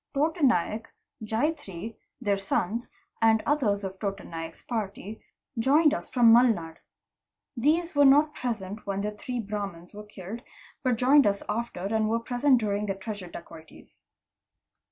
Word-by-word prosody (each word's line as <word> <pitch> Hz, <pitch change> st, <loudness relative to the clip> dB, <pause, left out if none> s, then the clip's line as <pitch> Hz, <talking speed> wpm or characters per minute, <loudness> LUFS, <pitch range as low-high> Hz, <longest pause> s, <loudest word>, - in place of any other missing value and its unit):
Tota 315 Hz, +4 st, 0 dB
Naik, 225 Hz, -, +2 dB, 0.4 s
Jatrya, 220 Hz, -, -2 dB, 0.3 s
their 205 Hz, -5 st, 0 dB
sons, 200 Hz, +4 st, -2 dB, 0.3 s
and 220 Hz, -1 st, +4 dB
others 220 Hz, -9 st, +1 dB
of 190 Hz, 0 st, -6 dB
Tota 200 Hz, -2 st, -3 dB
Naik's 165 Hz, -1 st, -8 dB
party, 215 Hz, -2 st, -5 dB, 0.4 s
joined 295 Hz, +6 st, +4 dB
us -, -, -4 dB
from 235 Hz, -3 st, +6 dB
Mulnad. 215 Hz, -10 st, +3 dB, 0.8 s
'These 320 Hz, +8 st, +1 dB
were 285 Hz, 0 st, +6 dB
not 295 Hz, +3 st, +5 dB
present 215 Hz, -4 st, -5 dB
when 200 Hz, 0 st, -1 dB
the 210 Hz, +1 st, -2 dB
three 240 Hz, +4 st, -5 dB
Brahmans 200 Hz, -5 st, -5 dB
were 210 Hz, -, -8 dB
killed, 210 Hz, +2 st, -8 dB, 0.4 s
but 255 Hz, -2 st, +1 dB
joined 260 Hz, +2 st, +5 dB
us 200 Hz, 0 st, 0 dB
after 235 Hz, -5 st, -3 dB
and 215 Hz, +2 st, 0 dB
were 230 Hz, -, +2 dB
present 250 Hz, +3 st, +2 dB
during 210 Hz, -1 st, -1 dB
the 195 Hz, -, -1 dB
treasure 195 Hz, -2 st, -7 dB
dacoities. 165 Hz, -2 st, -13 dB
220 Hz, 145 wpm, -27 LUFS, 195-250 Hz, 0.8 s, from